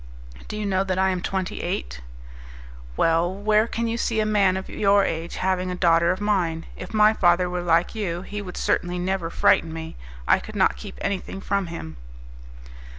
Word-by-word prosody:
"Do 210 - -5
you 210 - -3
know 190 -1 +1
that 185 -1 -2
I 190 0 +3
am 180 -1 -2
twenty 190 0 -3
eight?" - - -4 1.0
"Well, 165 +2 +2
where 210 +3 +2
can 230 0 -2
you 230 0 -1
see 225 -2 0
a 215 - +2
man 200 -3 +3
of 190 - -6
your 200 -1 +3
age 165 +1 -3
having 185 -1 -1
a 180 - -3
daughter 170 -1 +3
of 185 - -2
mine? 180 -6 0
If - - -8
my 215 0 +5
father 175 -3 +3
were 180 0 -3
like 170 0 +2
you, 185 -5 -3
he 205 +1 -6
would 185 -3 -8
certainly 175 0 0
never 180 -1 -1
frighten 165 0 +3
me; 160 0 -7 0.3
I - - +5
could - - -10
not - - +3
keep - - -10
anything 195 0 -3
from 200 -1 -1
him." 80 - -7
185 Hz, 195 wpm, -24 LUFS, 170-200 Hz, 1.0 s, my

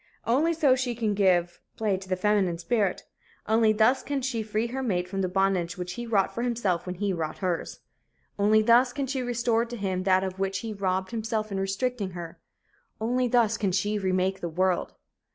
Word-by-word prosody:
Only 305 +8 +2
so 310 -3 +2
can 255 - +5
she 250 -2 -2 0.2
give 180 -3 +2 0.2
play 215 -3 +1
to 190 0 -8
the 185 - +1
feminine 190 -2 +1
spirit. 200 +1 0 0.4
Only 220 0 +4
thus 220 +5 +3
can 280 -2 -3
she 245 -3 -1
free 215 +1 -1
her 255 +3 -4
mate 180 -8 -1
from 195 +1 -3
the 185 - 0
bondage 190 -2 0
which 180 0 -4
he 240 0 -6
wrought 200 -4 +1
for 235 - -3
himself 225 -8 -1
when 180 - -3
he 200 +1 -1
wrought 160 -3 -3
hers. 180 -3 -3 0.6
Only 215 +2 +4
thus 245 +2 +5
can 280 -1 -2
she 265 0 -2
restore 235 -2 +1
to 240 0 -7
him 190 -3 -2
that 185 0 +3
of 190 0 -4
which 195 0 -1
he 225 -2 -5
robbed 190 -1 -1
himself 220 -2 -2
in 195 - -2
restricting 195 +1 -2
her. 170 -1 -8 0.6
Only 245 +3 +1
thus 230 -2 +2
can 200 -3 +1
she 205 +3 0
remake 190 0 0
the 170 - -3
world. 180 +2 0
205 Hz, 205 wpm, -27 LUFS, 185-235 Hz, 0.6 s, can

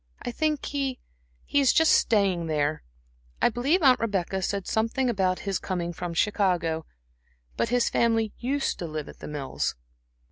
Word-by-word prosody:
"I 245 - -3
think 305 +2 -1
he 275 -3 -2 0.5
he 285 - +2
is 275 -2 +5
just 320 0 +4
staying 195 -6 +3
there 150 -1 0 0.6
I - - +4
believe 275 +10 +1
Aunt 260 -2 +6
Rebecca 190 -4 -1
said 195 0 -2
something 230 +3 0
about 185 -4 0
his 195 -2 -2
coming 175 -2 -3
from 170 0 -5
Chicago. 175 -5 +1 0.7
But 230 - 0
his 245 0 +2
family 225 -2 +1
used 270 +3 -1
to 170 - -4
live 155 -1 -5
at - - -12
The - - -8
Mills." 145 -3 -3
205 Hz, 165 wpm, -26 LUFS, 175-250 Hz, 0.7 s, Aunt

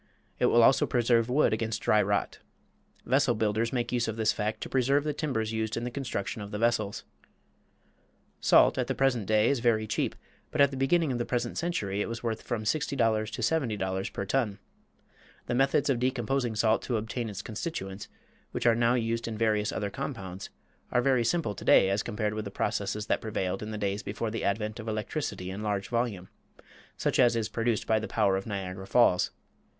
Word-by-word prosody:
It - - +4
will 120 - +5
also 130 - +5
preserve 120 -1 +2
wood 135 -2 +3
against 110 0 -2
dry 105 - +4
rot. 100 0 -1 0.7
Vessel 135 -2 +3
builders 110 +2 0
make 120 -2 -1
use 120 -2 0
of 110 - -2
this 110 -1 +2
fact 105 +1 -2
to - - -4
preserve 135 +2 +2
the 150 -1 -1
timbers 115 -9 -2
used 110 0 -2
in 115 - -3
the 125 - -3
construction 120 -6 -4
of 100 - -7
the 105 - -4
vessels. 110 -3 0 1.4
Salt - - +5
at - - 0
the - - -1
present 125 -7 +1
day 110 +1 +3
is 140 - +2
very 115 -2 +2
cheap, 110 - -1 0.3
but 155 - -5
at 140 -1 +6
the - - -5
beginning 140 +3 +2
of 120 - -2
the - - +1
present 120 -1 -2
century 105 - -1
it - - -2
was 115 0 -5
worth 115 -2 -2
from 120 -3 -3
$60 140 +4 -1 0.3
to - - -6
$70 105 -11 -1
per 100 - -4
ton. 110 -3 0 0.9
The - - -2
methods 135 +2 +2
of 135 -4 +1
decomposing 125 -1 0
salt 110 0 +2
to 120 - -1
obtain 110 +2 -3
its 105 0 -6
constituents, 105 - -5 0.5
which - - -3
are 120 +1 +4
used 115 0 -1
in 110 -2 -4
various 105 -1 +1
other 100 -1 -3
compounds, 100 -8 -6 0.4
are 125 - +2
very 130 -3 +3
simple 115 -2 0
to - - -9
day 95 - +5
as 100 +1 +1
compared 105 -1 -2
with 110 0 -4
the - - -4
processes 105 +1 -2
that - - 0
prevailed 95 -4 -2
in 105 - -5
the 110 - -4
days 100 0 -1
before 110 +2 -4
the 115 - -3
advent 105 +2 -1
of 110 - -7
electricity 105 -3 -3
in 100 +2 -6
large 100 -2 -2
volume, 115 -6 -1 0.7
such - - 0
as 120 -2 +5
is 115 -2 0
produced 115 -1 -1
by 110 -1 +2
the 110 - -5
power 100 -4 +2
of 95 +2 -3
Niagara 95 -2 -5
Falls. 115 -7 +4
110 Hz, 200 wpm, -28 LUFS, 105-120 Hz, 1.4 s, at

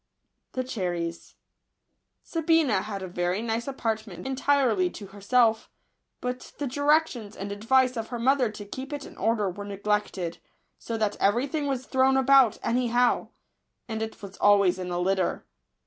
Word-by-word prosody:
s 255 - +1 1.7
IJj^ABINA 325 -6 +3
had 200 -3 -5
a - - -4
very 180 +1 -1
nice 230 +1 -2
apartment 220 -7 -3
entirely 265 -8 +2
to 200 +3 -9
herself; 220 +4 +1 0.5
but 250 0 -5
the 290 - -2
directions 285 -5 +1
and 200 +1 -6
advice 255 +5 +2
of 225 -1 -3
her 245 - -5
mother 255 0 +2
to 210 -1 -9
keep 260 +7 -7
it 290 -1 -5
in - - -12
order 225 -3 +1
were 190 +2 -5
neglected, 200 -3 -2 0.4
so 230 - -4
that 215 -2 0
every 220 +6 +2
thing 290 0 -2
was 265 -2 -2
thrown 265 0 +3
about 265 -4 +5
any 245 +1 +1
how, 240 +1 +2 0.6
and 220 -1 -4
it 220 0 -5
was 195 -1 -9
always 200 -3 +4
in 180 -1 -4
a 175 - -2
litter. 185 0 0
225 Hz, 155 wpm, -27 LUFS, 200-265 Hz, 1.7 s, about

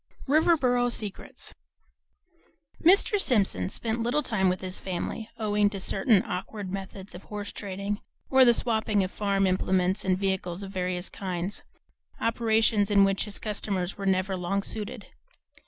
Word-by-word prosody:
VII 275 - 0
RIVERBORO 250 -7 +3
SECRETS 210 -4 -3 1.3
Mr. 395 +4 +5
Simpson 205 - +1
spent 225 +3 -2
little 245 +6 +1
time 190 -7 +1
with 185 - -2
his 185 0 -5
family, 195 +4 -4
owing 210 -2 +2
to 200 -1 -6
certain 195 +2 +3
awkward 190 +2 -5
methods 195 0 -7
of 175 - -10
horse 205 -1 -5
trading, 200 +1 -4 0.3
or 265 -1 +6
the 240 -2 +6
"swapping" 220 -4 +1
of 185 - -4
farm 200 -1 +1
implements 185 +1 +1
and 185 -1 +1
vehicles 190 -1 -2
of 195 - -7
various 180 -1 -2
kinds, 185 0 -4 0.6
operations 225 -2 +2
in 200 -1 +5
which 195 -1 +1
his 205 -2 -4
customers 200 -3 -3
were 195 - -4
never 190 0 +1
long 185 +2 -1
suited. 210 0 -5
200 Hz, 150 wpm, -27 LUFS, 190-220 Hz, 1.3 s, or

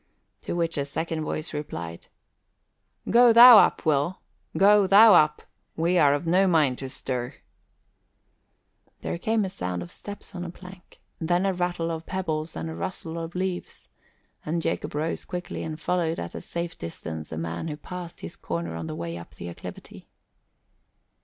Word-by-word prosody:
To - - -4
which 165 -3 -1
a 140 - -1
second 160 +3 -3
voice 155 +1 -4
replied, 85 - -6 1.0
"Go 240 +1 +7
thou 235 -1 +11
up, - - +2
Will, 155 +4 +1 0.4
go 200 0 +6
thou 210 +3 +8
up! 150 -3 +4 0.3
We 170 +2 +2
are 145 -2 +5
of 145 +4 -4
no 185 +4 +3
mind 150 -8 +2
to 135 - -5
stir." 125 0 -4 1.7
There 170 - -4
came 220 +2 +1
the - - -1
sound 90 - -4
of 85 - -11
steps 205 0 -9
on 175 -1 -5
a 175 - -5
plank, 180 +1 -14 0.2
then 175 +3 +1
a 195 - +1
rattle 175 -2 -2
of 165 0 -6
pebbles 160 -4 -3
and 80 0 -4
a 80 - -5
rustle 165 - -5
of 165 +1 -7
leaves; 185 -1 -4 0.5
and 165 +2 -1
Jacob - - -2
rose 155 +2 -2
quickly 180 -1 -5
and 155 -1 -5
followed 170 -2 0
at 85 - -6
a - - -6
safe 170 0 -5
distance 80 -1 -7
a 80 - -5
man 85 - -4
who 150 -2 -5
passed 175 +2 -8
his 85 - -7
corner 85 -1 -4
on 80 -1 -5
the 80 - -5
way 85 +1 -5
up 85 - -13
the 85 - -7
acclivity. 85 - -10
165 Hz, 170 wpm, -26 LUFS, 130-180 Hz, 1.7 s, thou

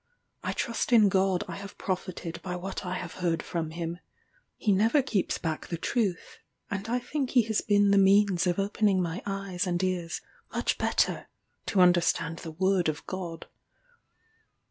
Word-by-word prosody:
I - - -2
trust 235 +1 -2
in 220 -4 +7
God 190 -1 +2
I 170 - -6
have 200 0 -9
profited 180 -3 -4
by 180 -1 -4
what 190 +3 -5
I 180 - -2
have 175 -2 -5
heard 165 -3 0
from 165 -2 -3
him. 170 +1 -4 0.6
He 210 - +1
never 225 +8 +4
keeps 205 -7 0
back 160 -2 -3
the 170 - -3
truth, 195 -1 -2 0.3
and 200 +2 -3
I 245 - +2
think 260 +2 -2
he 245 -3 +4
has 220 -1 0
been 205 -1 +3
the 200 - +5
means 195 -2 +4
of 175 - +1
opening 200 -1 +2
my 175 0 -2
eyes 195 -2 -2
and 175 +1 0
ears 180 -3 -2 0.3
much - - -1
better - - +1 0.4
to 190 - +3
understand 175 -2 +3
the 165 - -7
word 185 +1 +1
of 150 0 -4
God. 175 -3 -5
185 Hz, 170 wpm, -28 LUFS, 175-205 Hz, 0.6 s, in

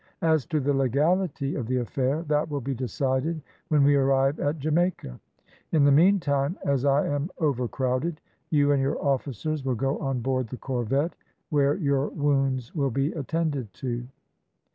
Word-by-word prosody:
As 160 -4 +2
to 155 -2 0
the 145 +1 +1
legality 140 +3 +1
of 120 -5 -3
the 130 +1 0
affair, 130 +5 -1
that 150 0 0
will 145 -1 -2
be 135 +1 -3
decided 130 +5 -1 0.3
when 150 -2 +3
we 145 +1 +5
arrive 135 +1 +2
at 145 +3 0
Jamaica. 155 - -1 0.5
In 155 -3 +4
the 140 - +5
meantime, 150 -2 +3
as 140 -1 +1
I 140 +1 +3
am 145 +3 -1
overcrowded, 135 - -1 0.3
you 145 -2 +3
and 140 -1 +3
your 135 +3 0
officers 140 +2 -1
will 130 -2 0
go 135 +4 -1
on 135 -4 -1
board 130 0 -1
the 125 - -7
corvette, 135 +6 -1 0.4
where 145 -1 +3
your 140 -5 +1
wounds 135 -4 0
will 140 -4 0
be 135 +5 0
attended 150 -6 -2
to." 120 +3 -4
140 Hz, 165 wpm, -26 LUFS, 130-150 Hz, 0.5 s, we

